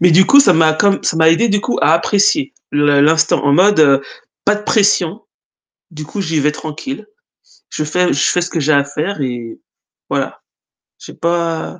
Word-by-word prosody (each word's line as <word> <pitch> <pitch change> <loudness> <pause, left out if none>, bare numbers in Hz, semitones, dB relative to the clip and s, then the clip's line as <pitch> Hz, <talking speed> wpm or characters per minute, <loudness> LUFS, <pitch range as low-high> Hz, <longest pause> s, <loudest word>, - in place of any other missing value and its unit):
Mais 180 +1 +4
du 185 +4 +4
coup 280 0 +6
ça 200 -9 +4
m'a 160 -1 +3
comme 200 +3 +1
ça 160 - -1
m'a 160 0 +4
aidé 230 +8 +1
du 205 0 0
coup 245 - -3
à - - +3
apprécier 205 - +1 0.2
le 145 -1 +2
l'instant 160 +2 +2
en 140 - +2
mode 155 -6 +3 0.4
pas 210 - +2
de 210 - -7
pression, 205 -2 0 0.7
du 155 -2 -9
coup 200 +7 -7
j'y 160 -4 -2
vais 150 +1 0
tranquille. 155 - -8 0.6
Je 155 - -4
fais 180 +4 0
je 140 +2 +1
fais 180 - 0
ce 175 - -4
que 165 - -3
j'ai 155 +1 +1
à 140 -1 +3
faire 155 +5 -5
et 120 -4 -6 0.5
voilà. - - -3 0.6
J'ai - - -12
pas 170 0 -3
165 Hz, 195 wpm, -15 LUFS, 150-200 Hz, 0.7 s, coup